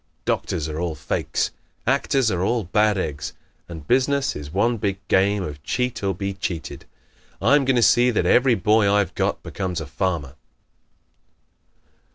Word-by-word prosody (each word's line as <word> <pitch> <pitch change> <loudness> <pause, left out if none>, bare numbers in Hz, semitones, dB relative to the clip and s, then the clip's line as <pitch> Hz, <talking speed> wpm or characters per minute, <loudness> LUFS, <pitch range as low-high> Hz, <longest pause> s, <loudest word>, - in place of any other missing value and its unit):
Doctors 80 - -1
are 80 0 -4
all 85 -2 -2
fakes. 80 +1 -2 0.3
Actors 135 -2 +2
are 90 -2 -1
all 115 +4 +1
bad 105 +3 +2
eggs; 75 -6 -4 0.4
and 80 -4 -9
business 135 +2 +2
is 75 -1 -7
one 115 +6 +1
big 100 -2 -1
game 100 +1 +3
of 75 -4 -7
cheat 125 - -2
or 95 -2 0
be 100 +2 -3
cheated. 95 -3 -5 0.5
I'm 145 -1 +4
going 135 0 +2
to 120 - +3
see 120 +3 +5
that 105 -7 0
every 125 +6 +4
boy 105 +1 +3
I've 100 -3 +1
got - - -1
becomes 95 -3 -3
a 80 - -5
farmer." 75 -2 -2
100 Hz, 160 wpm, -23 LUFS, 85-120 Hz, 0.5 s, see